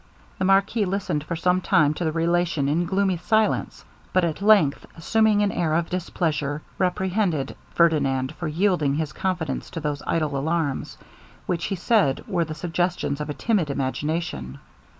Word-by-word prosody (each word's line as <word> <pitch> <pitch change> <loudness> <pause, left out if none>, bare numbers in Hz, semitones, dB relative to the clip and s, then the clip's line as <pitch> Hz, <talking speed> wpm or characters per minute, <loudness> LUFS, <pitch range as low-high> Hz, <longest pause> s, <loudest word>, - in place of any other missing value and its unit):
The 185 - +1
marquis 195 +3 +3
listened 185 -6 -2
for 170 - -3
some 180 +2 +1
time 150 -4 +3
to 175 - -4
the 160 - 0
relation 170 -2 +1
in 160 +5 +1
gloomy 190 0 +1
silence, 220 +5 0 0.3
but 185 - +3
at 165 +2 -3
length 200 -9 +4
assuming 215 +4 +3
an 205 - +1
air 160 -2 0
of 170 0 -1
displeasure, 155 -5 -2 0.2
reprehended 185 -5 0 0.2
Ferdinand 140 -6 +2
for 170 - -5
yielding 160 -3 +1
his 155 -1 -2
confidence 180 -4 -2
to 165 - -5
those 150 -2 -3
idle 155 -3 0
alarms, 150 0 -2 0.5
which 170 -2 -1
he 200 - -2
said 175 - +2
were 175 -5 0
the 155 -1 -6
suggestions 175 -3 -1
of 150 - -4
a 145 - -3
timid 205 -10 0
imagination. 135 - -3
170 Hz, 160 wpm, -24 LUFS, 150-185 Hz, 0.5 s, length